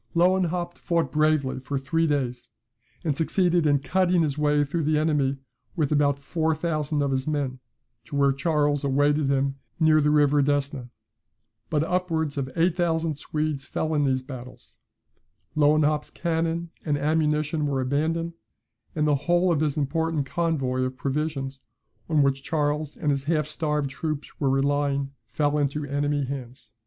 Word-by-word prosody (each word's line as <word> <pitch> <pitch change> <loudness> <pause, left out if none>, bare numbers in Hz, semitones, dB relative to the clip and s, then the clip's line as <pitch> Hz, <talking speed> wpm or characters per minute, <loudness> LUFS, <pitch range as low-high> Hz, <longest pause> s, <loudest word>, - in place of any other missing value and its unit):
Lewenhaupt 175 0 +1
fought 165 -6 0
bravely 155 -3 +1
for 135 +2 -3
three 165 +5 0
days, 125 -5 -2 0.5
and 155 -5 0
succeeded 175 +1 +2
in 145 -1 +4
cutting 180 +4 +2
his 145 -3 -1
way 150 0 +2
through 155 +4 -2
the 155 +1 +2
enemy, 150 -3 +1 0.4
with 155 -5 0
about 145 -1 +3
four 160 +3 -1
thousand 155 -2 -1
of 140 - 0
his 130 +1 -1
men, 140 -4 -1 0.5
to - - -7
where 140 -1 +4
Charles 145 0 +1
awaited 145 +1 +2
him 135 0 +1 0.2
near 155 -1 +5
the 150 - +3
river 145 -1 +4
Desna; 140 -3 -1 0.8
but 155 -2 +1
upwards 165 -4 -1
of 135 -2 -2
eight 170 +1 +2
thousand 165 -2 0
Swedes 150 -3 -2
fell 160 +2 -2
in 150 -1 +2
these 130 -2 +1
battles; 130 -2 -11 0.8
Lewenhaupt's 150 0 +3
cannon 165 0 -2
and 150 -2 0
ammunition 150 0 +1
were 140 -2 0
abandoned; 160 +6 -1 0.6
and 150 -1 +1
the 150 - +4
whole 175 +5 +2
of 160 - +2
his 155 -1 0
important 155 +1 0
convoy 135 -5 -1
of 130 0 -2
provisions, 140 -1 -2 0.5
on 155 -3 +4
which 135 0 +1
Charles 150 0 -1
and 150 -4 0
his 140 -1 -1
half 155 -1 +1
starved 150 -2 -1
troops 155 +1 -5
were 140 - +1
relying, 140 0 +1 0.2
fell 150 0 0
into 145 +1 0
the 145 -2 -6
enemy's 145 -1 0
hands. 130 -2 -7
150 Hz, 160 wpm, -25 LUFS, 140-160 Hz, 0.8 s, near